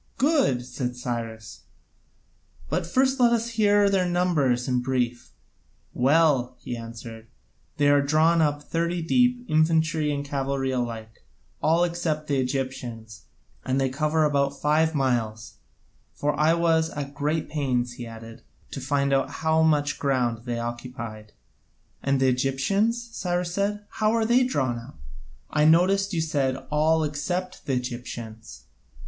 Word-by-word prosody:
"Good," 260 Hz, -, +2 dB
said 125 Hz, 0 st, -4 dB
Cyrus, 115 Hz, -3 st, -6 dB, 1.0 s
"but -, -, -1 dB
first 265 Hz, +7 st, +2 dB
let 240 Hz, -1 st, +5 dB
us 235 Hz, 0 st, 0 dB
hear 205 Hz, -3 st, +3 dB
their 190 Hz, -2 st, +1 dB
numbers 155 Hz, -9 st, +1 dB
in 125 Hz, -1 st, +1 dB
brief." 125 Hz, -2 st, -2 dB, 0.6 s
"Well," 135 Hz, -2 st, +2 dB
he 120 Hz, -, -5 dB
answered, 115 Hz, -1 st, -9 dB, 0.5 s
"they 145 Hz, -, +3 dB
are 145 Hz, 0 st, +5 dB
drawn 155 Hz, +4 st, +3 dB
up 145 Hz, -1 st, 0 dB
thirty 170 Hz, +2 st, -1 dB
deep, 245 Hz, +6 st, +2 dB
infantry 155 Hz, -1 st, +2 dB
and 145 Hz, 0 st, -3 dB
cavalry 135 Hz, -1 st, -2 dB
alike, 115 Hz, -3 st, -4 dB, 0.4 s
all 165 Hz, +2 st, +3 dB
except 170 Hz, -3 st, -1 dB
the 140 Hz, -2 st, +1 dB
Egyptians, 125 Hz, -5 st, -4 dB, 0.4 s
and 130 Hz, +1 st, 0 dB
they 135 Hz, -1 st, +1 dB
cover 155 Hz, +4 st, +1 dB
about 140 Hz, -2 st, +1 dB
five 155 Hz, +2 st, +2 dB
miles; 115 Hz, -5 st, -1 dB, 0.6 s
for 145 Hz, 0 st, 0 dB
I 155 Hz, +3 st, +3 dB
was 165 Hz, -1 st, +2 dB
at 140 Hz, -2 st, -6 dB
great 150 Hz, +2 st, -1 dB
pains," 125 Hz, -5 st, -1 dB
he 120 Hz, -1 st, -8 dB
added, 115 Hz, 0 st, -11 dB, 0.3 s
"to 135 Hz, -, -6 dB
find 140 Hz, +1 st, 0 dB
out 135 Hz, 0 st, +1 dB
how 160 Hz, 0 st, +1 dB
much 145 Hz, -2 st, +2 dB
ground 125 Hz, -4 st, 0 dB
they 120 Hz, -1 st, -2 dB
occupied." 115 Hz, -2 st, -6 dB, 0.7 s
"And 135 Hz, 0 st, +1 dB
the 135 Hz, -, +3 dB
Egyptians?" 195 Hz, -, 0 dB
Cyrus 175 Hz, -1 st, -2 dB
said, 205 Hz, +2 st, -1 dB
"how 215 Hz, +1 st, 0 dB
are 230 Hz, -1 st, +2 dB
they 245 Hz, +3 st, +4 dB
drawn 130 Hz, -, -1 dB
up? 115 Hz, -, -13 dB, 0.5 s
I 150 Hz, 0 st, +3 dB
noticed 190 Hz, +5 st, +4 dB
you 170 Hz, -4 st, 0 dB
said, 140 Hz, -5 st, 0 dB, 0.2 s
'all 155 Hz, +2 st, +3 dB
except 175 Hz, +5 st, -3 dB
the 135 Hz, -, 0 dB
Egyptians.'" 115 Hz, -, -6 dB
145 Hz, 140 wpm, -25 LUFS, 125-165 Hz, 1.0 s, let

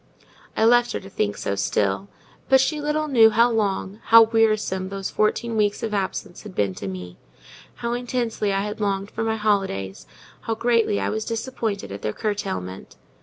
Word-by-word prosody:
I 220 Hz, -, +4 dB
left 240 Hz, +1 st, +4 dB
her -, -, -2 dB
to 195 Hz, 0 st, -13 dB
think 105 Hz, -, -1 dB
so 100 Hz, -, -2 dB
still: 100 Hz, 0 st, 0 dB, 0.4 s
but 265 Hz, 0 st, +6 dB
she 300 Hz, +3 st, 0 dB
little 300 Hz, +1 st, -1 dB
knew 230 Hz, -6 st, +6 dB
how 235 Hz, +2 st, +4 dB
long, 205 Hz, -2 st, -1 dB
how 230 Hz, 0 st, +9 dB
wearisome 215 Hz, -4 st, +1 dB
those 195 Hz, -1 st, -4 dB
fourteen 225 Hz, +2 st, 0 dB
weeks 205 Hz, -1 st, +1 dB
of 220 Hz, -2 st, -2 dB
absence 195 Hz, -1 st, -3 dB
had 205 Hz, -4 st, -11 dB
been 100 Hz, -2 st, 0 dB
to 100 Hz, -, -7 dB
me; 90 Hz, -1 st, -7 dB, 0.6 s
how 235 Hz, 0 st, -3 dB
intensely 240 Hz, -4 st, -1 dB
I 195 Hz, 0 st, +1 dB
had 210 Hz, +1 st, -5 dB
longed 200 Hz, 0 st, -1 dB
for 225 Hz, -, -3 dB
my 220 Hz, 0 st, 0 dB
holidays, 195 Hz, -, -1 dB, 0.3 s
how 225 Hz, -, -3 dB
greatly 230 Hz, -3 st, +2 dB
I -, -, -1 dB
was 220 Hz, 0 st, -2 dB
disappointed 225 Hz, -, -3 dB
at 100 Hz, +1 st, -7 dB
their 105 Hz, -, -2 dB
curtailment. 190 Hz, -, -4 dB
210 Hz, 180 wpm, -23 LUFS, 190-230 Hz, 0.6 s, how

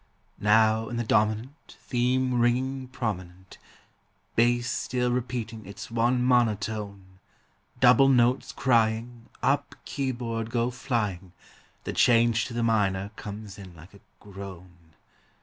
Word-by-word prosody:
Now 110 Hz, +1 st, +3 dB
in 120 Hz, -, -4 dB
the 120 Hz, -, -1 dB
dominant 110 Hz, +6 st, -1 dB
Theme 125 Hz, 0 st, 0 dB
ringing 130 Hz, +2 st, 0 dB
prominent, 95 Hz, -8 st, -6 dB, 0.8 s
Bass 120 Hz, +1 st, +2 dB
still 125 Hz, 0 st, -1 dB
repeating 120 Hz, -3 st, -3 dB
its 100 Hz, +2 st, -9 dB
one 120 Hz, +2 st, +1 dB
monotone, 105 Hz, -5 st, -1 dB, 0.6 s
Double 125 Hz, +2 st, +6 dB
notes 125 Hz, 0 st, +2 dB
crying, 115 Hz, -1 st, 0 dB
Up 135 Hz, +4 st, +1 dB
keyboard 120 Hz, -4 st, -3 dB
go 120 Hz, +1 st, 0 dB
flying, 105 Hz, -8 st, -3 dB, 0.5 s
The -, -, -4 dB
change 115 Hz, -1 st, +3 dB
to 120 Hz, -, -7 dB
the 120 Hz, -, 0 dB
minor 100 Hz, -3 st, +1 dB
comes 105 Hz, 0 st, -8 dB
in 95 Hz, -3 st, -11 dB
like 85 Hz, +4 st, -15 dB
a 100 Hz, -, -15 dB, 0.2 s
groan. 90 Hz, -4 st, -12 dB
115 Hz, 115 wpm, -27 LUFS, 100-125 Hz, 0.8 s, Double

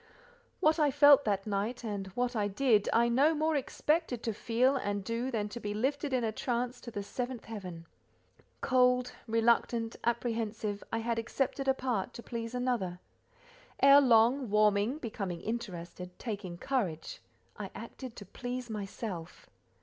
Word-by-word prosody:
What 315 Hz, -1 st, +4 dB
I 300 Hz, -2 st, +4 dB
felt 285 Hz, 0 st, +7 dB
that 200 Hz, -2 st, 0 dB
night, 215 Hz, +4 st, -2 dB
and 205 Hz, -3 st, -3 dB
what 245 Hz, 0 st, 0 dB
I 210 Hz, -2 st, +1 dB
did, 215 Hz, 0 st, +2 dB
I 235 Hz, +1 st, +4 dB
no 280 Hz, +7 st, +4 dB
more 310 Hz, +1 st, +1 dB
expected 290 Hz, -2 st, 0 dB
to 225 Hz, -, -1 dB
feel 240 Hz, +6 st, +2 dB
and 205 Hz, -6 st, -2 dB
do, 230 Hz, +4 st, -2 dB
than 215 Hz, -5 st, -1 dB
to 240 Hz, -, -6 dB
be 205 Hz, -2 st, -4 dB
lifted 280 Hz, +5 st, -1 dB
in 255 Hz, -2 st, +1 dB
a 220 Hz, -, 0 dB
trance 245 Hz, +2 st, -2 dB
to 240 Hz, -, -8 dB
the 205 Hz, -3 st, -5 dB
seventh 245 Hz, +3 st, -5 dB
heaven. 185 Hz, -7 st, -7 dB, 0.8 s
Cold, 250 Hz, -1 st, +3 dB, 0.2 s
reluctant, 230 Hz, 0 st, +2 dB
apprehensive, 225 Hz, -3 st, -1 dB
I -, -, 0 dB
had 230 Hz, 0 st, -1 dB
accepted 270 Hz, +4 st, -2 dB
a 265 Hz, -, +4 dB
part 245 Hz, -8 st, -2 dB
to 235 Hz, -, -8 dB
please 230 Hz, 0 st, -5 dB
another: 235 Hz, -8 st, -1 dB, 0.8 s
ere 275 Hz, +1 st, +8 dB
long, 245 Hz, 0 st, +4 dB
warming, 210 Hz, +4 st, +3 dB
becoming 200 Hz, -, -4 dB
interested, 180 Hz, -5 st, -6 dB
taking 200 Hz, -6 st, -5 dB
courage, 185 Hz, -, -2 dB, 0.3 s
I -, -, -6 dB
acted 255 Hz, -3 st, -8 dB
to 205 Hz, -, -9 dB
please 245 Hz, +4 st, -5 dB
myself. 195 Hz, -4 st, -6 dB
235 Hz, 155 wpm, -31 LUFS, 205-255 Hz, 0.8 s, ere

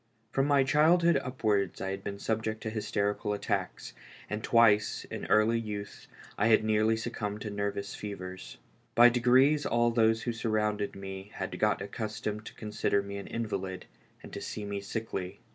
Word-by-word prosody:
From 135 Hz, +1 st, +1 dB
my 140 Hz, -2 st, +4 dB
childhood 165 Hz, +5 st, +4 dB
upwards 105 Hz, -8 st, -1 dB
I 95 Hz, -, -3 dB
had 95 Hz, -, -5 dB
been 100 Hz, -1 st, -4 dB
subject 110 Hz, +1 st, -2 dB
to 110 Hz, -, -3 dB
hys 110 Hz, -1 st, -4 dB
terical 105 Hz, 0 st, 0 dB
attacks, 100 Hz, -, -3 dB, 0.4 s
and 105 Hz, +1 st, -3 dB
twice, 110 Hz, -2 st, +4 dB
in -, -, -5 dB
early 110 Hz, +2 st, +4 dB
youth, 105 Hz, -2 st, -6 dB, 0.3 s
I 105 Hz, -, +4 dB
had 110 Hz, -1 st, +5 dB
nearly 110 Hz, +1 st, +2 dB
succumbed 105 Hz, -2 st, -4 dB
to 105 Hz, -, -4 dB
nervous 100 Hz, 0 st, -3 dB
fevers. 95 Hz, -7 st, -7 dB, 0.4 s
By 120 Hz, +1 st, +9 dB
degrees 130 Hz, +5 st, +4 dB
all 120 Hz, 0 st, +2 dB
those 115 Hz, -1 st, +3 dB
who 120 Hz, -, -1 dB
surrounded 105 Hz, -2 st, -1 dB
me 95 Hz, 0 st, -7 dB
had -, -, -5 dB
got -, -, +2 dB
accustomed 105 Hz, +1 st, -4 dB
to -, -, -10 dB
consider 105 Hz, -2 st, 0 dB
me 100 Hz, 0 st, -6 dB
an 100 Hz, -, -7 dB
invalid, 95 Hz, -5 st, -4 dB, 0.4 s
and -, -, -11 dB
to -, -, -5 dB
see 105 Hz, -, -5 dB
me 100 Hz, -1 st, -4 dB
sickly. 100 Hz, -3 st, -5 dB
110 Hz, 170 wpm, -30 LUFS, 100-115 Hz, 0.4 s, By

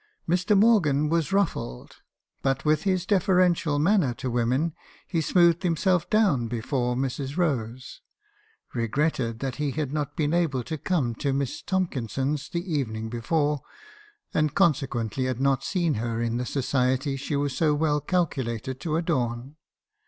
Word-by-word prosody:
"Mr. 180 Hz, +4 st, +2 dB
Morgan 165 Hz, -10 st, +4 dB
was 165 Hz, +1 st, 0 dB
ruffled; 170 Hz, -, -1 dB, 0.4 s
but 135 Hz, +1 st, 0 dB
with 155 Hz, +2 st, +2 dB
his 185 Hz, -2 st, +1 dB
deferential 185 Hz, -6 st, +2 dB
manner 155 Hz, -, +2 dB
to 130 Hz, -1 st, -4 dB
women, 125 Hz, +7 st, +1 dB, 0.3 s
he 165 Hz, -3 st, -1 dB
smoothed 170 Hz, +1 st, +4 dB
himself 180 Hz, 0 st, +1 dB
down 195 Hz, -, +3 dB
before 125 Hz, +1 st, -1 dB
Mrs. 135 Hz, +2 st, -3 dB
Rose, 130 Hz, -7 st, -2 dB, 0.3 s
— 435 Hz, +1 st, -37 dB
re 115 Hz, -2 st, -1 dB
gretted 125 Hz, -3 st, -1 dB
that 135 Hz, -3 st, -3 dB
he 150 Hz, -1 st, -1 dB
had 145 Hz, 0 st, -3 dB
not 145 Hz, -2 st, -2 dB
been 150 Hz, 0 st, 0 dB
able 155 Hz, -8 st, +1 dB
to 155 Hz, +5 st, -5 dB
come 140 Hz, -8 st, 0 dB
to 135 Hz, +4 st, -1 dB
Miss 140 Hz, +2 st, -2 dB
Tomkinson's 145 Hz, -, -2 dB
the 170 Hz, 0 st, -3 dB
evening 110 Hz, -6 st, -2 dB
before, 145 Hz, +5 st, 0 dB, 0.7 s
and 155 Hz, -1 st, +1 dB
consequently 130 Hz, -6 st, +1 dB
had 130 Hz, -2 st, -2 dB
not 135 Hz, -1 st, +2 dB
seen 175 Hz, -5 st, 0 dB
her 115 Hz, -1 st, -2 dB
in 115 Hz, 0 st, -1 dB
the 125 Hz, 0 st, -3 dB
society 130 Hz, 0 st, 0 dB
she 140 Hz, +2 st, -3 dB
was 140 Hz, -2 st, -1 dB
so 150 Hz, +1 st, +2 dB
well 150 Hz, -1 st, +1 dB
calculated 130 Hz, -, -2 dB
to 160 Hz, -3 st, -2 dB
adorn. 130 Hz, -5 st, -1 dB
145 Hz, 150 wpm, -26 LUFS, 125-170 Hz, 0.7 s, Morgan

